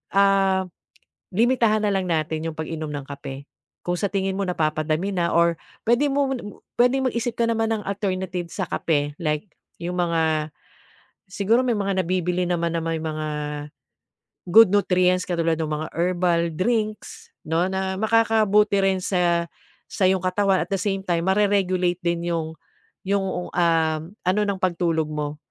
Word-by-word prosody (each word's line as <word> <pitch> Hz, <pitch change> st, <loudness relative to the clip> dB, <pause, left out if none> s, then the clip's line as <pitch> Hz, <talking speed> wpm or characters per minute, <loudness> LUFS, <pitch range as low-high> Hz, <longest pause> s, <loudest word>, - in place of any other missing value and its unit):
ah, 195 Hz, -1 st, +3 dB, 0.7 s
limitahan 230 Hz, -2 st, +3 dB
na 210 Hz, -, +2 dB
lang 190 Hz, -1 st, 0 dB
natin 160 Hz, -1 st, -1 dB
'yong 160 Hz, -, -5 dB
pag-inom 160 Hz, 0 st, -4 dB
ng 145 Hz, -1 st, -4 dB
kape. 140 Hz, -1 st, -8 dB, 0.4 s
Kung 175 Hz, 0 st, -1 dB
sa -, -, +1 dB
tingin 195 Hz, -1 st, -1 dB
mo 200 Hz, -, -1 dB
napapadami 155 Hz, +2 st, 0 dB
na 175 Hz, -2 st, 0 dB
or 170 Hz, -1 st, +3 dB, 0.3 s
pwede 240 Hz, +6 st, +3 dB
mo 275 Hz, -1 st, +1 dB
na -, -, -4 dB
m 205 Hz, -, -11 dB, 0.2 s
pwedeng 255 Hz, +2 st, +3 dB
mag-isip 235 Hz, 0 st, -2 dB
ka 235 Hz, -, +2 dB
naman 225 Hz, -1 st, +1 dB
ng 215 Hz, -, -4 dB
alternative 190 Hz, -3 st, -2 dB
sa 190 Hz, -, -1 dB
kape 145 Hz, -3 st, -1 dB
like 150 Hz, +2 st, -1 dB, 0.3 s
'yong 175 Hz, +1 st, -4 dB
mga, 160 Hz, -3 st, +1 dB, 0.8 s
siguro 210 Hz, +6 st, +2 dB
may 250 Hz, -2 st, +1 dB
mga 195 Hz, -2 st, 0 dB
nabibili 180 Hz, 0 st, 0 dB
naman 170 Hz, -1 st, -1 dB
na 165 Hz, -, -1 dB
may 165 Hz, 0 st, -2 dB
mga 155 Hz, -1 st, -4 dB, 1.3 s
good 225 Hz, +3 st, +9 dB
nutrients 185 Hz, -2 st, +3 dB
katulad 165 Hz, -2 st, 0 dB
no'ng 155 Hz, -1 st, -3 dB
mga 155 Hz, +1 st, -2 dB
herbal 175 Hz, 0 st, +1 dB
drinks, 215 Hz, +4 st, -2 dB, 0.2 s
'no, 165 Hz, +3 st, +1 dB
na 190 Hz, 0 st, -2 dB
makakabuti 215 Hz, -1 st, +3 dB
rin 190 Hz, -1 st, +2 dB
sa 175 Hz, -2 st, +1 dB, 0.4 s
sa 185 Hz, -2 st, +1 dB
iyong 190 Hz, 0 st, +2 dB
katawan, 190 Hz, +1 st, +2 dB
at -, -, -28 dB
the 195 Hz, -, 0 dB
same 195 Hz, -1 st, -2 dB
time, 170 Hz, -1 st, 0 dB
mare-regulate 185 Hz, -3 st, +1 dB
din 170 Hz, 0 st, -1 dB
'yong 160 Hz, -1 st, -3 dB, 0.5 s
'yong, 190 Hz, -2 st, -1 dB
um, 165 Hz, -2 st, +2 dB, 0.2 s
ano 185 Hz, +4 st, +2 dB
ng 200 Hz, -2 st, -2 dB
pagtulog 170 Hz, -3 st, 0 dB
mo. 150 Hz, -1 st, -4 dB
180 Hz, 160 wpm, -23 LUFS, 165-200 Hz, 1.3 s, good